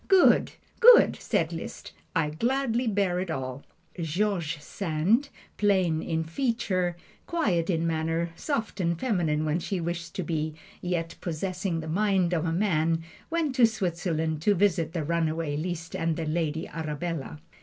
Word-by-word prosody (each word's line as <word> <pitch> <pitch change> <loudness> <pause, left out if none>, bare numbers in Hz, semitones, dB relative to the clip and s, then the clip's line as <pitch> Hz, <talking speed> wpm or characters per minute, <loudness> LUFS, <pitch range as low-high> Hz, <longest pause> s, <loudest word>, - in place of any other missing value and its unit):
"Good! 385 -2 +5 0.3
good!" 475 0 +8
said - - 0
Liszt, - - -7 0.2
"I 155 -3 +1
gladly 245 - 0
bear 195 -4 +1
it 185 -1 -3
all." 130 -3 -4 0.4
George 170 -1 -1
Sand, 190 - 0 0.3
plain 185 -6 +2
in 160 -1 -1
feature, 185 -2 -1 0.3
quiet 195 - +1
in 165 -2 +1
manner, 165 +1 0
soft 225 - -3
and 170 -2 0
feminine 170 -11 +1
when 155 +2 +1
she 185 +2 -2
wished 170 +1 -4
to 185 - -2
be, 155 -1 -2 0.3
yet 170 -2 -2
possessing 180 0 -2
the 160 - -7
mind 185 0 +2
of 165 -1 0
a - - 0
man, 165 -3 +1 0.3
went 325 -4 0
to 240 -2 +7
Switzerland 170 -6 -1
to 205 +4 +3
visit 170 -4 +2
the 165 -3 -1
runaway 160 -1 0
Liszt 165 +1 -4
and 165 -1 0
the 165 - -2
"Lady 160 0 -1
Arabella." 155 - -4
170 Hz, 150 wpm, -27 LUFS, 160-200 Hz, 0.4 s, good